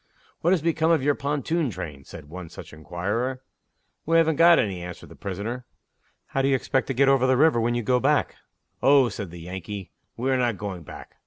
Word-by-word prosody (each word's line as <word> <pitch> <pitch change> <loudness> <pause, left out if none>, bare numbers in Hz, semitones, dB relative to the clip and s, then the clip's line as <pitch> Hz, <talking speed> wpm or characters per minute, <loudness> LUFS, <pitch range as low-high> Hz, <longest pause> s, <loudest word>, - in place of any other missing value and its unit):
"What 170 - +1
has 180 -4 +2
become 165 -1 +1
of 160 -5 +3
your 145 +1 +3
pontoon 145 +2 -1
train?" 75 -9 -7
said - - -11
one 85 +1 -8
such - - -11
inquirer. 100 +11 -3 0.6
"We 165 +1 +4
haven't 160 -2 +3
got 170 0 +7
any," 95 -6 0
answered 90 0 -8
the - - -13
prisoner. 105 +6 -5 0.7
"How 135 - 0
do 135 - +2
you 135 - +3
expect 130 0 0
to 135 - -2
get 135 +2 +4
over 135 -1 +4
the 130 -1 +3
river 150 -4 +4
when 120 +1 +1
you 120 - -1
go 125 +2 +2
back?" 145 +2 +1 0.4
"Oh," 135 -2 +5
said 100 -3 -6
the 85 0 -10
Yankee, 95 +1 -7 0.3
"we 130 +3 0
are 130 - +3
not 120 -4 0
going 95 -3 -5
back. 80 - -12
125 Hz, 215 wpm, -25 LUFS, 95-140 Hz, 0.7 s, got